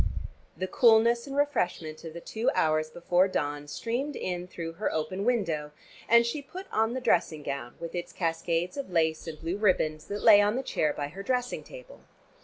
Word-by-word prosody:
The 185 - -1
coolness 235 +2 +4
and 275 0 -5
refreshment 175 - -1
of 165 -1 -7
the 170 - -7
two 225 +6 -1
hours 155 0 +2
before 175 +3 +2
dawn 145 -5 -2
streamed 245 - -3
in 180 -1 -3
through 165 -2 -6
her 195 +6 -2
open 185 +6 -2
window, 165 -12 0 0.4
and 235 0 +7
she 260 +5 -2
put 370 +7 -9
on 225 +1 +1
the - - -1
dressing 165 -9 +1
gown 140 -4 -5
with 170 -1 -6
its 175 -1 -4
cascades 165 +3 -1
of 280 -7 -4
lace 160 -2 +1
and 155 -2 -6
blue 170 +4 -3
ribands 155 -7 +1
that 205 +1 -4
lay 210 -3 +9
on 205 +2 +2
the 265 - -1
chair 155 - 0
by 145 0 -4
her 190 +6 -8
dressing 250 +3 -1
table. - - -12
180 Hz, 195 wpm, -28 LUFS, 160-235 Hz, 0.4 s, lay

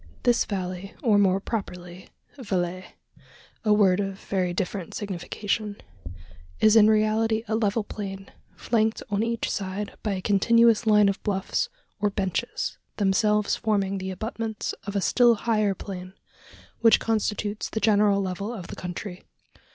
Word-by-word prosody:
This 245 -1 +3
valley, 185 0 -5
or, 215 -5 +4
more 195 -1 +3
properly, 180 -4 -6 0.3
valle 185 -7 -2 0.8
a 215 - +2
word 200 -3 +4
of 195 -1 -2
very 185 -2 -1
different 185 -1 -4
signification 205 +2 -3 0.8
is 215 0 +5
in 215 -1 +8
reality 220 +1 +2
a 220 - 0
level 220 0 +1
plain, 195 -2 -7 0.2
flanked 220 -1 0
on 205 0 +1
each 230 0 -1
side 200 +1 -4
by 210 - -1
a 185 - -3
continuous 230 +2 +4
line 210 -1 +6
of 195 - -1
bluffs 195 -2 -1 0.3
or 205 0 +2
"benches" 195 -2 -2 0.2
themselves 210 +1 +2
forming 200 -3 0
the 190 0 -4
abutments 220 +2 -4
of 200 - -4
a 200 - +1
still 240 +6 +4
higher 215 -2 +1
plain, 185 -1 -8 0.7
which 225 -1 +6
constitutes 215 -1 -1
the 220 - -2
general 205 -2 +3
level 195 +4 -3
of 190 -7 -7
the - - -6
country. 180 +1 -6
205 Hz, 145 wpm, -25 LUFS, 190-220 Hz, 0.8 s, in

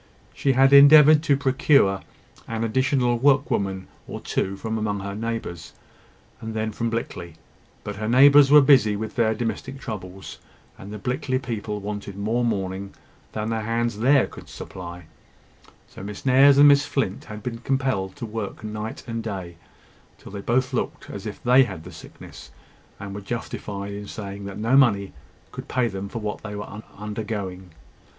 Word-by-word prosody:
She 135 - +1
had 135 +2 +4
endeavoured 150 +2 +8
to 145 -4 +2
procure 130 -7 +3 0.5
an 115 0 -3
additional 125 +1 +1
work 140 +1 +3
woman 95 -1 -2 0.2
or - - -6
two 95 +1 -2
from 110 +1 -3
among 105 -2 -2
her 100 0 -5
neighbours, 110 -6 -5 0.7
and 110 0 -6
then 110 0 -2
from 115 +2 -2
Blickley: 85 -7 -5 0.5
but 105 -1 -6
her 110 +1 -3
neighbours 140 +3 +7
were 150 +1 +8
busy 130 -7 +5
with 110 +1 -5
their 110 -2 +2
domestic 120 +4 -4
troubles, 95 -5 -8 0.4
and 100 - -11
the 105 - -6
Blickley 130 +4 -2
people 110 -5 -4
wanted 100 -1 -6
more 110 +4 -1
mourning 95 -3 -3 0.4
than 110 +1 -3
the 110 -1 -1
hands 115 0 -2
there 135 +3 +4
could - - -12
supply; 85 -1 -9 0.8
so - - -12
Miss 100 +4 -8
Nares 135 +2 +6
and 145 +1 +8
Miss 140 0 +5
Flint 135 -9 -2
had 105 -1 -9
been 115 -2 -5
compelled 130 -7 -1
to - - -6
work 110 -2 -6
night 110 +1 -6
and 115 -1 -4
day, 95 -6 -6 0.6
till - - -13
they 100 0 -6
both 130 +4 0
looked 125 - -3
as 100 +2 -7
if 105 - -8
they 125 +2 +5
had 130 - +6
had 90 -5 -8
the - - -10
sickness, - - -12 0.5
and 100 -1 -7
were 100 - -6
justified 100 -2 -5
in 100 0 -7
saying 100 -1 -7
that 100 0 -7
no 115 +5 +1
money 105 -8 +3 0.4
could - - -8
pay 125 -2 0
them 100 -2 -5
for 115 - -7
what 105 -2 -4
they 105 -1 -7
were 105 +1 -7 0.2
undergoing. 105 -3 -5
110 Hz, 175 wpm, -24 LUFS, 100-130 Hz, 0.8 s, endeavoured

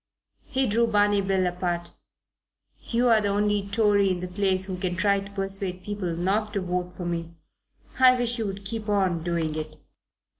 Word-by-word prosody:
He 265 0 0
drew 230 +1 +2
Barney 205 -2 +3
Bill 190 -1 +1
apart. 175 -1 -2 0.9
"You're 235 -2 +2
the 205 - 0
only 205 0 0
Tory 205 -2 +3
in 185 -1 -1
the 180 - -4
place 190 0 +1
who 185 -2 -5
can 180 -1 -2
try 200 +2 +2
to 195 0 -9
persuade 195 -2 -2
people 200 -5 -3
not 205 +5 0
to 200 - -1
vote 180 0 -3
for 180 - -5
me. 170 -1 -4 0.6
I 255 -1 +7
wish 240 -1 -1
you 220 - -1
would 195 0 -6
keep 220 +1 -4
on 190 -5 +1
doing 165 -2 -1
it." 155 0 -6
195 Hz, 180 wpm, -26 LUFS, 180-205 Hz, 0.9 s, I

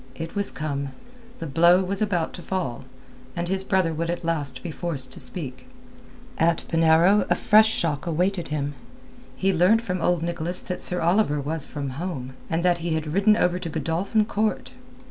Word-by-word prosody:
It 165 0 -6
was 200 -1 -1
come. 140 -3 -4 0.4
The - - -6
blow 170 +5 +4
was 195 +2 -3
about 180 -6 0
to 180 - -8
fall, 170 -12 -3 0.5
and 170 0 -2
his 190 +1 -1
brother 190 -4 +1
would 165 +2 -2
at 175 - -3
last 145 -6 -1
be 175 - -4
forced 145 -6 -2
to - - -7
speak. 135 - -4 0.7
At 165 0 +2
Penarrow 165 +5 +4
a - - +4
fresh 215 +1 +5
shock 165 -4 -1
awaited 175 +2 0
him. 145 -1 -2 0.6
He 195 0 +1
learnt 185 +7 +4
from 180 -5 -3
old 175 -1 +1
Nicholas 170 +1 -1
that 180 - -4
Sir 180 - -1
Oliver 170 -3 +2
was 150 +2 -2
from 140 -3 -5
home, 130 -8 -5 0.2
that 170 +1 +1
he 165 -1 -1
had 155 -1 -3
ridden 205 +3 +4
over 180 -3 +1
to 170 - -4
Godolphin 165 +8 0
Court. 215 0 -1
170 Hz, 180 wpm, -24 LUFS, 155-185 Hz, 0.7 s, fresh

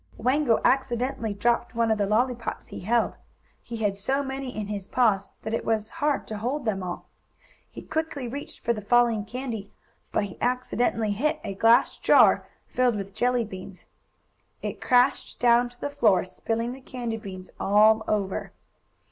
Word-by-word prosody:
Wango 255 0 +2
accidentally 250 -3 +1
dropped 240 +3 0
one 230 -1 +2
of 220 - +1
the 200 - +1
lollypops 235 +3 -1
he - - -7
held. 230 +5 +1 0.5
He 235 - -7
had 205 -3 0
so 265 +8 -1
many 270 -1 -4
in 215 - -2
his 200 -2 -5
paws 210 -6 +2
that 220 - -4
it 230 - -1
was 220 -1 -1
hard 295 -1 +1
to 215 -1 -6
hold 255 +5 -2
them 200 -3 0
all. 180 -1 -5 0.6
He - - -10
quickly 315 -5 -3
reached 280 +5 -7
for 235 - +1
the 215 - -6
falling 230 0 +3
candy, 230 -4 -5 0.4
but - - +1
he 200 -2 -8
accidentally 245 -3 0
hit 300 +9 0
a 200 - -4
glass 225 +4 +4
jar - - +5 0.2
filled 250 -2 +1
with 195 -1 -5
jelly 245 -1 +1
beans. 190 -2 -10 0.8
It - - -4
crashed 245 -1 +2
down 240 0 +4
to 245 0 -22
the 285 - -3
floor, 225 -10 +3
spilling 230 +5 -3
the 265 +1 -9
candy 240 -3 -4
beans 190 -4 -9
all 215 +2 +5
over. 200 -3 -2
230 Hz, 170 wpm, -26 LUFS, 210-250 Hz, 0.8 s, jar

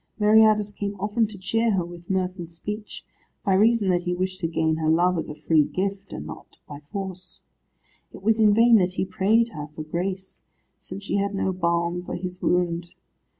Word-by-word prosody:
Meriadus 215 -1 +5
came 200 -1 -4
often 210 +3 +1
to 205 -1 -10
cheer 225 +4 +1
her 180 -3 0
with 175 0 -12
mirth 185 -1 -1
and 170 -1 -7
speech, 210 +5 -7 0.4
by 195 - +3
reason 215 +1 +4
that 175 -1 +2
he 180 0 -2
wished 185 +1 -2
to 165 - -1
gain 160 -1 0
her 155 -1 0
love 175 +3 +3
as - - -5
a 150 - -6
free 155 -1 +3
gift, 195 +4 -3
and 75 - -6
not - - -11
by 145 -1 -8
force. 185 -2 -6 0.7
It - - -12
was 225 +1 +2
in 215 -1 +6
vain 230 +2 +6
that 185 -2 +1
he 185 - -1
prayed 220 +5 +2
her 150 -7 -7
for 155 +1 -8
grace, 185 +4 -4 0.4
since 200 - -8
she 200 - -1
had 200 0 -1
no 190 -1 0
balm 170 0 0
for - - -5
his 180 0 -6
wound. 175 -1 0
185 Hz, 200 wpm, -24 LUFS, 170-205 Hz, 0.7 s, in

